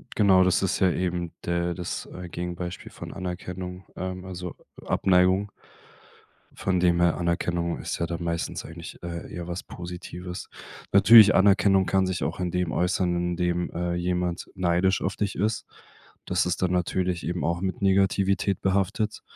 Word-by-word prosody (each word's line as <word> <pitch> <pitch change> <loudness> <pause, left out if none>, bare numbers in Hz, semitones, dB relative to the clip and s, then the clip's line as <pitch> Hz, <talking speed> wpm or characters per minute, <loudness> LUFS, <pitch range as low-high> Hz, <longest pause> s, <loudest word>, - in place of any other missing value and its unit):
Genau, 95 -3 +5
das 90 +1 +2
ist 95 - 0
ja 95 - +4
eben 90 -1 -2
der 85 0 0
das, 90 -2 -5
äh, 90 0 -8
Gegenbeispiel 90 +1 -5
von - - -9
Anerkennung, 90 0 -6
ähm, 95 0 -5
also 90 -1 -6 0.3
Abneigung. 95 +2 +3 1.0
Von 95 -1 0
dem 85 -1 +3
her, 85 -2 +3
Anerkennung 85 0 -1
ist - - -3
ja 85 - +1
dann 85 +1 -4
meistens 85 -1 -2
eigentlich, 80 +1 -10
äh, 85 -1 -6
eher 85 -1 -5
was 90 +1 -4
Positives. 90 0 -7 0.4
Natürlich, 105 +1 +8
Anerkennung 95 0 +4
kann 95 0 +2
sich 95 -1 -2
auch - - -3
in 90 -1 -1
dem 90 -1 -1
äußern, 90 0 +1
in 90 0 -1
dem, 90 0 0
äh, 90 0 -2
jemand 90 0 -1
neidisch 95 +1 +2
auf 95 - -2
dich 100 -2 -2
ist. 110 +4 -1 0.6
Das - - +1
ist 90 - -1
dann 90 -1 +1
natürlich 90 0 -1
eben 90 +1 -2
auch 85 +1 0
mit 95 0 -3
Negativität 95 0 +2
behaftet, 100 +3 0
90 Hz, 160 wpm, -26 LUFS, 85-95 Hz, 1.0 s, Natürlich